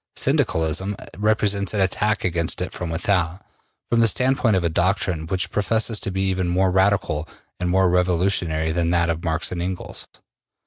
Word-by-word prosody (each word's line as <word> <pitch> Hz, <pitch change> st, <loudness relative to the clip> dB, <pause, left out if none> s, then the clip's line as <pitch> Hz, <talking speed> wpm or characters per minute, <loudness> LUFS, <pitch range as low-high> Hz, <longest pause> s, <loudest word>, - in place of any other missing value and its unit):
Syndicalism 80 Hz, +5 st, 0 dB, 0.2 s
represents 105 Hz, -1 st, +1 dB
an 100 Hz, -, +1 dB
attack 105 Hz, +3 st, 0 dB
against 85 Hz, -2 st, -1 dB
it -, -, -4 dB
from 90 Hz, -, -5 dB
without, 90 Hz, +1 st, -1 dB, 0.4 s
from 120 Hz, -, +1 dB
the 115 Hz, -, +5 dB
standpoint 125 Hz, -2 st, +3 dB
of 95 Hz, -, 0 dB
a -, -, +2 dB
doctrine 85 Hz, -1 st, 0 dB
which 95 Hz, +2 st, -1 dB
professes 110 Hz, +1 st, 0 dB
to -, -, -2 dB
be 95 Hz, 0 st, -2 dB
even 95 Hz, -1 st, 0 dB
more 90 Hz, +2 st, +2 dB
radical 95 Hz, -5 st, +1 dB, 0.3 s
and 90 Hz, -1 st, -1 dB
more 95 Hz, +1 st, +3 dB
revolutionary 90 Hz, -3 st, +1 dB
than 85 Hz, 0 st, 0 dB
that 85 Hz, -1 st, +2 dB
of 80 Hz, 0 st, -5 dB
Marx 80 Hz, 0 st, -1 dB
and 90 Hz, -1 st, -3 dB
Engels. 90 Hz, +1 st, -5 dB
90 Hz, 170 wpm, -22 LUFS, 85-100 Hz, 0.4 s, the